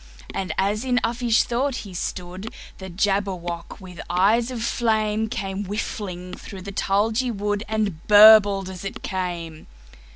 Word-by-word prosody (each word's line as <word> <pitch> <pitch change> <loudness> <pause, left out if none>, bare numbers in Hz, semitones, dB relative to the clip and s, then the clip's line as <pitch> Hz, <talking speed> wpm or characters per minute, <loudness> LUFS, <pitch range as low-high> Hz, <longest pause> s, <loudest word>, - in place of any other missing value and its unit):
And 185 -3 -3
as 205 +4 0
in 250 -1 +1
uffish 235 -1 +2
thought 255 +3 -1
he 195 - -10
stood, 180 +4 -5 0.3
The 190 -1 -7
Jabberwock, 185 -2 -2
with 180 -3 -10
eyes 210 +7 +3
of 240 -3 -4
flame, 220 -2 0
Came 195 -4 -4
whiffling 185 -3 -5
through 190 -3 -9
the 200 - -7
tulgey 220 +6 0
wood, 205 -1 -2
And 210 -7 -2
burbled 205 -2 +7
as 185 -1 -8
it 195 - -6
came! 175 -4 -4
200 Hz, 140 wpm, -23 LUFS, 185-220 Hz, 0.3 s, burbled